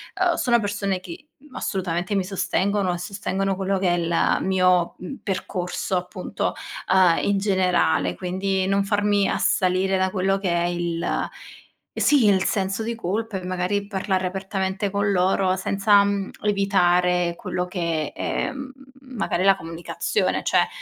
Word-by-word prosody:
ehm, 365 -2 +2
sono 240 -1 +2
persone 200 -3 -2
che 335 - -10 0.2
assolutamente 180 -3 -2
mi 195 - +1
sostengono, 195 0 0
e - - -3
sostengono 195 +1 -2
quello 195 0 0
che 190 -1 +1
è 175 - +2
il 170 0 +1
mio, 185 -2 +2
mhmm, 225 +9 -7
percorso 185 -1 -2
appunto, 180 +1 -3 0.4
uhm, 185 -3 +5
in 200 0 +2
generale. 190 -3 +1
Quindi, 190 +1 -1
non 195 +1 +1
farmi 205 0 +2
assalire 185 +1 +1
da 190 0 +1
quello 195 0 +1
che 195 -2 -2
è 170 0 +1
il 175 -1 -2 0.9
sì 285 -6 +4
il 190 -2 +4
senso 195 +1 -1
di 230 +1 -3
colpa, 220 0 -3
e - - -9
magari 185 +2 -1
parlare 190 -2 -1
apertamente 190 +1 -2
con 200 +1 0
loro 185 0 +2
senza, 200 +2 +3
mhmm, 200 -1 -1
evitare 180 -3 +2
quello 180 +1 -3
che, 170 -4 -2
ehm, 270 0 -3 0.3
magari 245 -8 -2
la 195 0 +6
comunicazione. 165 +1 -2
Cioè, - - +3
190 Hz, 145 wpm, -23 LUFS, 180-200 Hz, 0.9 s, la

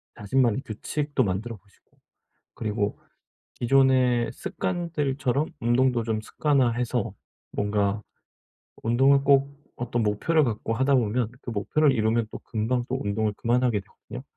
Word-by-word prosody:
자신만의 120 +3 +1
규칙도 145 +5 -2
만들어 105 +4 -3
보시고 100 +2 -30 0.6
그리고 105 -2 -2 0.6
기존의 130 -1 +3
습관들처럼 140 - -2
운동도 120 0 +2
좀 110 -1 -1
습관화해서 125 -5 0 0.4
뭔가 105 0 0 0.8
운동을 135 +4 +4
꼭 140 0 +4 0.3
어떤 120 -1 -2
목표를 145 +10 +2
갖고 115 0 -2
하다 135 +3 +2
보면 115 -1 +1
그 - - -7
목표를 140 +8 +2
이루면 110 0 +1
또 - - -6
금방 120 +2 -1
또 130 +1 -1
운동을 105 +1 0
그만하게 120 -2 +1
되거든요. 125 +5 -11
120 Hz, 300 characters per minute, -26 LUFS, 110-135 Hz, 0.8 s, 운동을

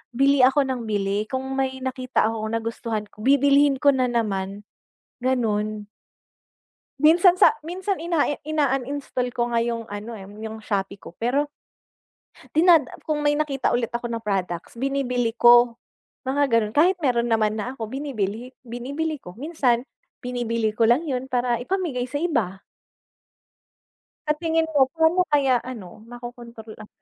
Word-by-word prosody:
bili 275 +2 +4
ako 265 +3 +5
nang 255 -4 -4
bili 205 0 -1
kung 260 +2 -3
may 265 -1 -1
nakita 255 -1 -1
akong 220 0 -3
nagustuhan 225 -1 -3
ko, - - -21
bibilhin 280 +2 +4
ko 285 - +5
na 260 -2 +1
naman, 205 -4 -2 0.6
gano'n. 215 -4 -1 1.1
Minsan 345 +4 +6
sa - - +7
minsan 370 +4 -2
ina 335 -3 +1 0.2
in-uninstall 275 -3 -1
ko 240 -1 -1
nga 230 - +3
'yong 230 -1 -3
ano 205 +3 -6
eh, 190 - -10
'yong 220 +1 -8
Shopee 195 -2 -3
ko 170 - -12
pero, 275 +6 0 1.1
dinad 330 -2 +5 0.2
kung 305 -1 -1
may 295 0 +2
nakita 290 -3 0
ulit 240 -2 0
ako 240 0 -3
ng 230 -1 -4
products 190 0 -3
binibili 250 -4 -1
ko. 240 0 +6 0.5
Mga 275 +2 +1
gano'n 225 -2 +1
kahit 360 +5 +4
meron 240 -4 +1
naman 215 -1 +2
na 215 +4 -3
ako, 225 - -4
binibili 245 -4 -3 0.2
binibili 280 +7 -3
ko 180 - -11
minsan 265 -5 +1 0.4
binibili 230 -3 -1
ko 220 - -1
lang 250 +8 +3
'yon 260 -2 -2
para 245 -1 +1
ipamigay 340 -6 -2
sa 285 - -2
iba. 235 - -1 1.6
Sa 300 - +3
tingin 325 0 0
mo, 275 -3 +5
paano 330 +3 +3
kaya 270 -3 +4
ano 215 -9 -8
makokontrol 240 -2 -10
ang 215 -1 -11
245 Hz, 145 wpm, -23 LUFS, 225-285 Hz, 1.6 s, sa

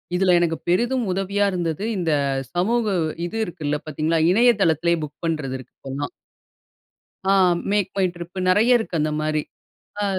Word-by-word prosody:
இதில 185 0 +3
எனக்கு 165 -2 0
பெரிதும் 240 +6 +1
உதவியா 195 +2 0
இருந்தது, 175 0 -2
இந்த 170 -3 0 0.4
சமூக 220 +6 +1 0.4
இது 210 +6 -5
இருக்குல்ல, 150 -3 -3
பாத்தீங்களா? 155 +2 0
இணையதளத்திலேயே 175 -7 +3
புக் 145 0 -8
பண்றது 150 -5 -2
இருக்கு 130 - -14
இப்பெல்லாம். 135 +2 -5 1.2
ஆ - - +5 0.4
MakeMyTrip 180 -4 -1
நெறைய 225 +7 +5
இருக்கு, 220 -6 -5
அந்த 155 - 0
மாதிரி. 155 0 0 0.6
அ - - +1
175 Hz, 130 wpm, -22 LUFS, 155-200 Hz, 1.2 s, ஆ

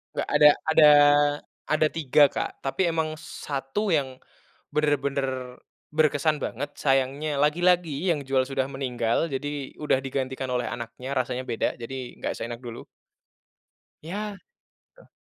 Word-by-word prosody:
Nggak - - -2
ada 150 0 +8 0.2
ada 155 -1 +7 0.8
ada 155 0 +3
tiga 145 -2 +4
Kak, - - -5
tapi 135 +7 0
emang 160 -2 -1
satu 145 +11 -4
yang, 135 -4 0 0.6
benar-benar 135 -4 -1 0.4
berkesan 155 0 +2
banget, 145 +4 -4
sayangnya 140 +2 0
lagi-lagi 175 +1 +2
yang 150 - -2
jual 135 -1 +2
sudah 135 0 -2
meninggal, 125 -1 -1
jadi 145 0 -4
udah 140 -3 +1
digantikan 130 -1 -3
oleh 125 -1 -1
anaknya, 120 +3 -6
rasanya 130 0 -2
beda. 115 +1 -1
Jadi, 130 +1 -7
nggak - - -2
seenak 115 0 -5
dulu. 120 -2 -8 1.2
Iya, 200 +5 -5 0.6
betul. - - -20
140 Hz, 125 wpm, -26 LUFS, 130-155 Hz, 1.2 s, ada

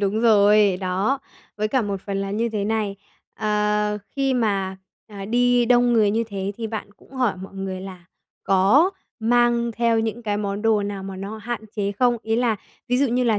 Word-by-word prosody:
Đúng 205 +2 0
rồi, 210 -3 +5
đó. 195 +8 0 0.4
Với 215 0 -1
cả 255 +3 +1
một 200 -2 -3
phần 200 0 -4
là 195 0 -3
như 225 +3 0
thế 210 -3 -2
này, 210 -2 -1 0.4
ờ, 210 0 0
khi 270 -1 0
mà, 200 -5 0 0.3
à, 200 -3 -8
đi 245 +3 +3
đông 245 0 +4
người 215 -3 +4
như 225 +2 0
thế 200 -1 -3
thì 230 - -4
bạn 215 -2 -6
cũng - - -22
hỏi 250 -7 0
mọi 190 +1 -10
người 190 -1 -4
là 185 -2 -9 0.4
có 200 - +4 0.3
mang 235 +1 +2
theo 235 -1 +2
những 225 +1 -2
cái 210 -2 -1
món 205 0 -3
đồ 220 -2 +3
nào 200 -1 -4
mà 195 0 -7
nó 200 +3 -6
hạn 235 +1 -4 0.2
chế 200 -1 -1
không? 240 +4 +2
Ý 225 0 0
là, 235 -3 +1 0.3
ví 250 - +2
dụ, 280 - +3
như 250 +1 +1
là 220 -3 +2
215 Hz, 205 wpm, -23 LUFS, 200-235 Hz, 0.4 s, rồi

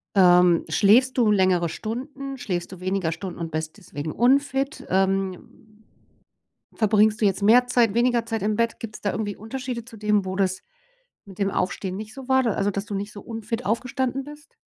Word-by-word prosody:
Ähm, 180 -2 +5
schläfst 250 +6 +4
du 225 -4 +4
längere 185 -4 +2
Stunden. 270 - -6
Schläfst 180 -7 -4
du 185 - -10
weniger 185 -3 -1
Stunden 185 +1 -7
und 165 -1 -4
bist 155 +3 -4
deswegen 155 -6 -6
unfit? 275 +3 +1
Ähm. 190 -1 -1 1.1
Verbringst 215 0 +3
du 215 - +2
jetzt 195 0 +1
mehr 245 +4 +6
Zeit 235 -4 +3
weniger 240 0 +2
Zeit 225 -2 -3
im 210 +1 0
Bett? 230 0 0
Gibt's 220 -1 -8
da 205 - 0
irgendwie 205 -2 -3
Unterschiede 245 +2 -5
zu 225 -1 -13
dem, 210 -1 +1
wo 190 0 -4
das 190 -1 0 0.6
mit 195 -2 -13
dem 195 -1 0
Aufstehen 185 0 -2
nicht 215 0 -8
so 265 -2 -10
war 265 0 +3
d 230 - +1
also 200 0 0
dass 200 +1 -4
du 205 - -5
nicht 205 +2 -4
so 205 - -10
unfit 230 +1 -5
aufgestanden 255 +4 -1
bist? 295 +2 -13
210 Hz, 190 wpm, -24 LUFS, 190-245 Hz, 1.1 s, mehr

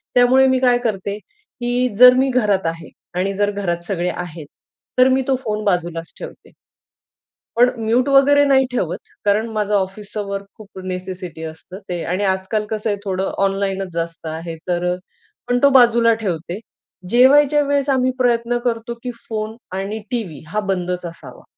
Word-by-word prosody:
त्यामुळे 255 +2 +5
मी 260 0 +2
काय 250 -1 +4
करते, 200 -3 -2
की 250 - -3
जर 250 +1 +10
मी 265 +1 +3
घरात 210 -7 +1
आहे 165 0 -4 0.3
आणि 195 +2 0
जर 205 0 +2
घरात 175 -4 -2
सगळे 175 -1 -1
आहेत. 170 -3 -7 0.5
तर 255 - +7
मी 260 +1 +3
तो 270 - +3
फोन 215 0 -2
बाजूलाच 175 -3 -1
ठेवते. - - -10 1.1
पण 245 +1 +6 0.2
म्यूट 245 +4 +2
वगैरे 280 +1 +5
नाही 265 -1 +4
ठेवत. 250 - -2 0.3
कारण 210 +2 +2
माझं 210 0 0
ऑफिसच 200 +2 -3
वर्क 200 0 -4
खूप 215 -3 -13
नेसेसिटी 185 -3 -6
असतं 160 +4 -8
ते 175 -2 -3
आणि 195 +3 -1
आजकाल 190 +3 -1
कसं 215 0 -2
आहे 205 - 0
थोडं 190 -1 -2
ऑनलाईनच 195 -1 -1
जास्त 165 0 -4
आहे. 165 +1 -5
तर 180 0 0 0.5
पण 245 0 +2
तो 280 - +8
बाजूला 235 -3 +5
ठेवते. 175 0 -3 0.5
जेवायच्या 280 +5 +5
वेळेस 285 0 0
आम्ही 255 -1 +2
प्रयत्न 240 -1 +1
करतो, 235 0 -1
की 250 - -3 0.2
फोन 215 0 -3 0.2
आणि 200 +3 -3
टीव्ही 220 -11 -4
हा 210 +7 -2
बंदच 180 -1 -2
असावा. 155 -7 -9
210 Hz, 160 wpm, -20 LUFS, 180-245 Hz, 1.1 s, जर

